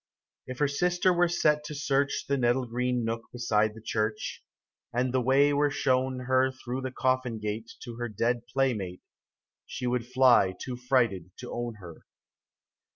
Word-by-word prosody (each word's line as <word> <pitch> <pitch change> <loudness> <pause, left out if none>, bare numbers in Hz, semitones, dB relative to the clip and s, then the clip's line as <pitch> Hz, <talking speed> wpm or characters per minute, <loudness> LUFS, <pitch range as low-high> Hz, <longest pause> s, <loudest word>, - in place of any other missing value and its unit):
If 130 -1 -6
her 145 - +2
sister 180 +5 +2
were 175 0 +3
set 150 -3 +2
to 150 - -6
search 140 -1 0
The 140 - +1
nettle 125 0 +1
green 125 0 -1
nook 115 0 -4
beside 110 -3 +1
the 110 - -11
church, 110 -1 -2 0.5
And 125 +1 0
the 130 - +2
way 140 +3 +4
were 145 +1 +3
shown 130 -2 0
her 130 +1 +2
Through 130 0 -5
the 130 0 -4
coffin 130 -2 0
gate 110 +2 -5
To 120 -2 -8
her 120 0 -3
dead 120 +3 -1
playmate, 120 -8 -1 0.6
She 125 - -5
would 120 -1 -1
fly 125 -7 +4
too 125 - -5
frighted 120 -8 +1
to 125 - -7
own 120 -1 -4
her. 90 -5 -13
125 Hz, 165 wpm, -28 LUFS, 115-130 Hz, 0.6 s, way